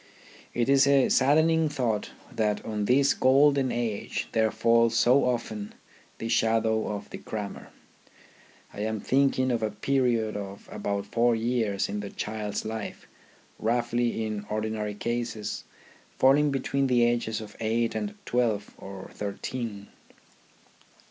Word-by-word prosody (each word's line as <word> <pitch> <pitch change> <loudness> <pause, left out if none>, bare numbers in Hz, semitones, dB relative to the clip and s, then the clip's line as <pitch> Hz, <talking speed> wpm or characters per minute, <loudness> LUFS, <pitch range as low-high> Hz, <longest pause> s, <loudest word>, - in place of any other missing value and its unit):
It 120 0 +1
is 135 0 +5
a 140 -2 +4
saddening 160 +4 +4
thought 120 -7 -1 0.2
that 105 -2 -1
on 105 -2 -2
this 135 +4 +4
golden 135 0 +4
age 115 -4 -2
there 110 -1 +2
falls 115 0 +3
so 130 +3 +4
often 110 -4 -3 0.4
the 115 - -4
shadow 110 -1 +2
of 100 -1 -5
the - - -7
crammer. 105 -2 -6 1.1
I - - -9
am 110 +1 -2
thinking 130 +1 +2
of 120 -2 0
a 110 - 0
period 115 0 0
of 100 -1 -7
about 100 -1 -3
four 120 +3 +2
years 115 -3 0
of 105 +1 -3
the 100 - -6
child's 105 0 -4
life, 110 -1 -5 0.5
roughly, 120 0 0
in 105 -1 -4
ordinary 110 -1 -2
cases, 115 -1 -3 0.5
falling 145 +3 +5
between 135 0 0
the 125 -2 +3
ages 120 -2 0
of 105 -1 -10
eight 115 +1 0
and 210 0 -3
twelve 110 -4 0
or 95 -1 -9
thirteen. 105 +1 -5
115 Hz, 135 wpm, -27 LUFS, 105-125 Hz, 1.1 s, is